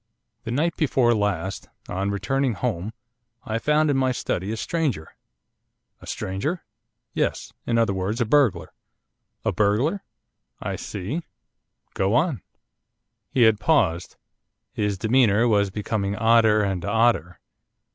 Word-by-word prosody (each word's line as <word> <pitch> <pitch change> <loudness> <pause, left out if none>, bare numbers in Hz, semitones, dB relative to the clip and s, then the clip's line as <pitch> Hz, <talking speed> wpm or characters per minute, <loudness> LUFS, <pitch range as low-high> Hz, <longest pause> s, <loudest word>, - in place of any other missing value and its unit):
'The - - -4
night 160 +7 0
before 130 -6 +3
last, 95 -3 -2 0.2
on 95 +2 -2
returning 120 +6 0
home, 105 -3 -3 0.5
I 115 -3 -2
found 150 +3 +2
in 135 - +1
my 130 -1 +2
study 100 -5 -2
a 110 - -3
stranger.' 135 - -2 0.9
'A - - -13
stranger?' 100 - -3 0.5
'Yes. - - -2
In 115 - +1
other 115 -4 +2
words, 95 +5 -2
a 120 - +2
burglar.' 115 -8 +2 0.7
'A - - +2
burglar? 115 - +1 0.6
I - - -3
see. 105 - -4 0.7
Go 95 +4 +1
on.' 135 - +1 0.9
He 125 - +3
had 110 -2 +5
paused. 90 - +1 0.6
His 105 -2 -1
demeanour 115 +1 +3
was 100 -3 +3
becoming 100 0 -2
odder 110 -1 +4
and 95 -3 -2
odder. 105 -4 +1
110 Hz, 125 wpm, -24 LUFS, 100-130 Hz, 0.9 s, had